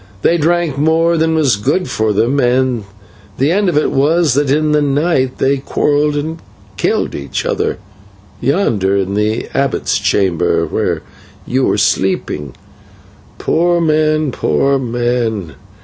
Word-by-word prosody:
They 170 - +3
drank 165 -3 0
more 165 +2 +2
than 160 0 +1
was 145 -8 +3
good 145 - 0
for 110 0 0
them, 120 +7 +1
and 125 -3 +1 0.5
the 140 +4 +2
end 200 +1 +2
of 170 - 0
it 150 - +1
was 155 +2 +2
that 145 +1 +1
in 150 +2 +2
the 150 0 +3
night 140 -2 0
they 140 +1 +1
quarrelled 145 +2 0
and 160 +3 -3 0.4
killed - - -1
each - - -4
other, - - -1 0.6
yonder 115 - +1
in 95 0 -1
the 105 +2 -1
abbot's 140 -1 0
chamber, 95 -5 +1
where - - -2 0.4
you 130 +1 0
are - - +1
sleeping 95 -8 -1 0.8
poor 175 +1 +1
men, 155 -2 +1
poor 135 - +1
men! 120 - -2
140 Hz, 140 wpm, -15 LUFS, 115-155 Hz, 0.8 s, They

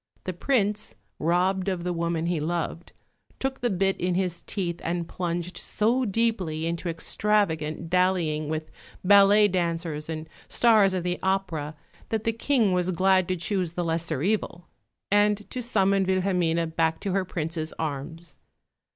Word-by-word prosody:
The 185 - -3
Prince, 210 0 0 0.2
robbed 185 +4 +1
of 180 -3 -2
the 180 0 -1
woman 170 -1 -1
he 170 -2 0
loved, 165 +1 -3 0.5
took 265 0 -3
the 240 - +1
bit 195 -1 0
in 180 0 +1
his 180 -2 -1
teeth, 175 -4 -3
and 170 0 -2
plunged 175 0 -3
so 240 +5 +1
deeply 195 -8 0
into 170 +1 -2
extravagant 165 -3 0
dallying 170 -4 +1
with 155 0 -4 0.3
ballet 200 +2 +7
dancers 170 -4 -2
and 160 0 -4 0.2
stars 215 -5 +4
of 180 - -2
the 180 0 -1
opera 175 -6 -1 0.3
that 220 -1 -1
the 225 - +1
King 230 -3 +2
was 180 0 +1
glad 185 0 +3
to 185 - 0
choose 175 0 -1
the 175 0 -2
lesser 165 -4 -1
evil, 190 -3 -1 0.5
and 205 0 +3
to 255 - -3
summon 200 -5 +2
Wilhelmine 180 -3 +1
back 160 0 +1
to 195 - -2
her 195 0 +1
Prince's 160 -2 -3
arms. 155 +1 -5
180 Hz, 150 wpm, -26 LUFS, 165-200 Hz, 0.5 s, ballet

